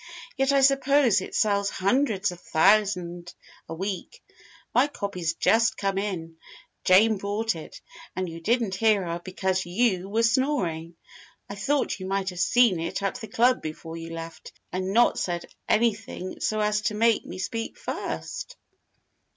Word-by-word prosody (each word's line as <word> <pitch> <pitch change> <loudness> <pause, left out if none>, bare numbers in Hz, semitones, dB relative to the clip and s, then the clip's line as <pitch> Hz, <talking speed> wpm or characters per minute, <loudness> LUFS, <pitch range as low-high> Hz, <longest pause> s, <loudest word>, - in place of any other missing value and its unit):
Yet 270 0 +2
I 275 -1 +4
suppose 275 -5 +4
it - - -7
sells 200 -2 +2
hundreds 210 -1 +1
of 175 - -10
thousand 180 -1 +1 0.3
a 165 - -4
week. 195 - -5 0.5
My 260 +3 +4
copy's 185 - -3
just 225 +5 +3
come 195 -1 -1
in. 165 -5 -4 0.5
Jane 210 +4 +5
brought 205 +2 -1
it 160 - -10 0.4
and 185 0 -2
you 165 0 -8
didn't 230 +1 +1
hear 210 0 +3
her 170 0 -4
because 185 0 -1
you 190 0 0
were 225 +3 +1
snoring. 230 - 0 0.5
I - - -7
thought 270 +5 -1
you 185 - -6
might 195 0 -1
have 180 - -8
seen 215 -1 +4
it 165 +4 -3
at 200 +6 -2
the 220 - -6
club 245 +4 +2
before 160 +1 -7
you 165 0 -7
left, 165 0 -8 0.2
and 185 +1 -2
not 235 +4 +4
said 175 -1 -2 0.2
anything 215 -4 0
so 215 - -1
as 210 0 +1
to 215 - 0
make 230 +1 +3
me 180 - -7
speak 225 +5 -4
first." - - -5
200 Hz, 160 wpm, -26 LUFS, 180-230 Hz, 0.5 s, Jane